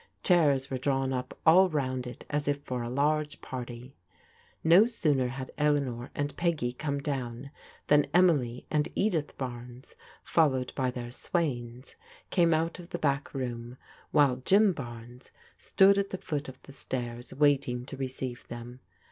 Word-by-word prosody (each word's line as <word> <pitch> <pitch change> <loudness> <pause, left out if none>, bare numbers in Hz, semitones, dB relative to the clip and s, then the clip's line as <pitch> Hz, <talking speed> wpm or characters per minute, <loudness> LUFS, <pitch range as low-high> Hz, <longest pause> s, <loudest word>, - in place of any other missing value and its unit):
Chairs 145 -7 +3
were 130 - -2
drawn 135 0 0
up 125 0 -4
all 185 +4 +7
round 130 -5 -2
it 125 - -9
as 145 -1 -2
if 145 0 +1
for 125 -3 -3
a 120 - -4
large 150 +3 0
party. 125 0 -7 0.7
No 175 +7 +7
sooner 150 - +1
had 130 +1 -6
Eleanor 140 -5 0
and 145 0 -2
Peggy 160 -8 0
come 140 +2 -3
down, 135 -2 -4 0.3
than 150 0 +4
Emily 145 -9 +3
and 150 -1 +1
Edith 170 -8 0
Barnes, 125 0 -7 0.3
followed 130 -6 +2
by 130 -2 0
their 120 -1 -6
swains, 125 -5 -3 0.3
came 170 -3 +4
out 165 +2 0
of 175 0 -11
the - - -3
back 145 -3 0
room, 120 -1 -4 0.3
while 145 -4 +4
Jim 195 +9 +4
Barnes 120 -2 -9 0.3
stood 195 +1 +4
at 200 0 -1
the 185 - -4
foot 150 -7 -4
of 130 - -12
the 140 - -13
stairs 120 -3 -5
waiting 130 -3 +2
to 135 - -6
receive 130 -2 -5
them. 120 +1 -8
135 Hz, 155 wpm, -29 LUFS, 125-155 Hz, 0.7 s, all